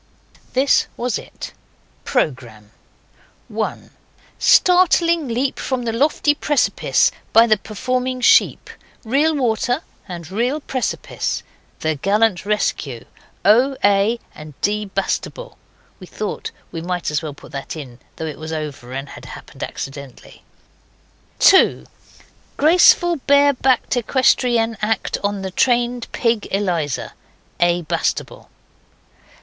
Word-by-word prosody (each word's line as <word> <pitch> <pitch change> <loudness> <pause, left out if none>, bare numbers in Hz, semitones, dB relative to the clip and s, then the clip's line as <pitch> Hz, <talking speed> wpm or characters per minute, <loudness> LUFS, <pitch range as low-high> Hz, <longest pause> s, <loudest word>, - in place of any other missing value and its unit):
This 265 +2 +3
was 245 -1 -1
it: - - -10 0.5
PROGRAMME 120 - -2 0.8
1. - - -4 0.5
Startling 340 -3 +4
leap 250 +3 -1
from 260 -2 -2
the 230 -1 -2
lofty 290 +4 +2
precipice 295 -1 +1 0.2
by 225 +1 +7
the 220 -2 +4
performing 255 +5 -3
sheep. 245 - +3 0.3
Real 290 +7 +2
water, 245 +2 0 0.2
and 175 -2 -8
real 245 +9 0
precipice. 260 -4 -3 0.4
The 160 0 0
gallant 200 +3 +1
rescue. 145 - -2 0.4
O. 250 +7 +4
A. 205 +3 +3
and 150 -2 -12
D. 210 +1 0
Bastable. 200 - -4 0.4
(We 185 - -11
thought 210 +2 -5 0.2
we 165 - -5
might 175 -1 -3
as 150 - 0
well 150 -3 -6
put - - -15
that 140 +3 -6
in 130 -6 -9 0.2
though 160 - -5
it 155 -2 -6
was 155 +1 -6
over 145 -6 -6
and 135 +1 -5
had - - -11
happened - - -12
accidentally.) 135 -2 -8 1.0
2. 385 - +5 0.7
Graceful 345 +2 +5
bare 285 0 +5
backed 260 -1 +1
equestrienne 240 -2 +2
act 215 0 -1
on 200 -1 -2
the 190 - -4
trained 240 +2 +1
pig, 230 -3 0
Eliza. 175 -8 -2 0.5
A. 175 0 +2
Bastable. 165 +1 -3
220 Hz, 120 wpm, -20 LUFS, 170-255 Hz, 1.0 s, by